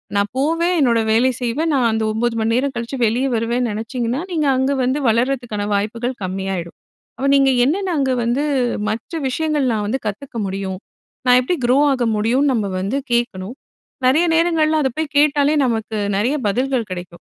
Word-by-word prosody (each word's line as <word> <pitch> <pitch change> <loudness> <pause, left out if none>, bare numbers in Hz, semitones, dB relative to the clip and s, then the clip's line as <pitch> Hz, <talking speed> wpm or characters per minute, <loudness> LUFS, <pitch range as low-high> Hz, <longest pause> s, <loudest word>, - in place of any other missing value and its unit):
நான் 200 0 +1
போவேன், 330 +5 +1
என்னோட 235 -5 +3
வேலை 240 +4 +4
செய்வேன், 295 +7 0
நான் 245 -4 +3
அந்த 220 0 -1
9 230 +1 -1
மணி 225 +1 +1
நேரம் 265 +3 0
கழிச்சு 235 +3 -4
வெளிய 240 +5 +1
வருவேன்னு 235 +2 0
நெனைச்சீங்கன்னா, 235 +4 -3
நீங்க 310 -4 0
அங்க 265 +2 +1
வந்து 260 +4 0
வளர்றதுக்கான 235 -3 0
வாய்ப்புகள் 230 +5 -2
கம்மியாயிடும். 185 -2 -4 0.4
அப்ப 275 - -1
நீங்க 275 -1 +4 0.2
என்னென்ன 365 +5 0
அங்க 265 -1 +1
வந்து, 245 +5 0 0.5
மற்ற 220 +8 -5 0.2
விஷயங்கள் 300 -1 0
நான் 210 -1 -1
வந்து 265 +5 -1
கத்துக்க 230 +4 -6
முடியும்? 190 -1 -4 0.5
நான் 250 0 +7
எப்படி 355 +8 -1
க்ரோ 250 +2 +3
ஆக 255 -2 0
முடியும்ன்னு, 255 +7 +2
நம்ம 215 -4 0
வந்து 205 +9 -1
கேட்கணும். 235 -2 -1 0.5
நெறைய 305 +7 +4
நேரங்கள்ல 320 -2 +2
அத 265 - +2
போய் 315 -2 -3
கேட்டாலே, 290 0 +3
நமக்கு 225 -2 -2 0.2
நெறைய 235 +9 +1
பதில்கள் 250 +1 0
கெடைக்கும். 175 -1 -7
245 Hz, 165 wpm, -19 LUFS, 220-275 Hz, 0.5 s, நான்